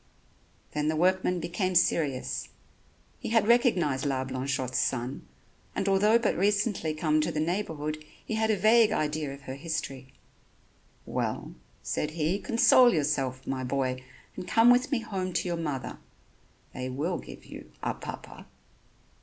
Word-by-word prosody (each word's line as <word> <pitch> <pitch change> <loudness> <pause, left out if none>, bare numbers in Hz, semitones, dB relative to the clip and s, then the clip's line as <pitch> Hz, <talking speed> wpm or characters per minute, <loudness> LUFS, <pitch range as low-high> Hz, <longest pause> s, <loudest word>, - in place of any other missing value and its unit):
Then 150 0 -1
the 155 - +1
workman 180 +2 +2
became 180 +2 -2
serious. 145 -6 +1 0.7
He - - -5
had 225 -2 +3
recognized 185 - +3
La 135 -2 0
Blanchotte's 130 -1 -2
son, 125 +1 -2 0.5
and 195 - -1
although 205 +3 +4
but 235 -2 0
recently 200 -4 +1
come 155 0 +2
to 165 +2 -1
the 155 - -2
neighborhood 155 -3 -2 0.2
he - - -4
had 220 0 +1
a 215 - +2
vague 220 +2 +5
idea 150 -5 -1
of 140 0 -9
her 130 -1 -7
history. 135 -3 -5 0.9
"Well," - - -3 0.3
said 150 - -1
he, 165 +5 +1
"console 240 +3 +5
yourself 135 - -1
my 130 -1 -3
boy, 130 -1 -1 0.3
and 185 - -7
come 230 +2 +6
with 250 +3 +3
me 260 -4 +1
home 190 -5 -4
to - - 0
your 175 - -1
mother. 145 -7 -4 0.7
They 130 0 -4
will 155 +8 -2
give - - -11
you... - - -11
a - - 0
Papa." - - -9
160 Hz, 150 wpm, -28 LUFS, 140-200 Hz, 0.9 s, come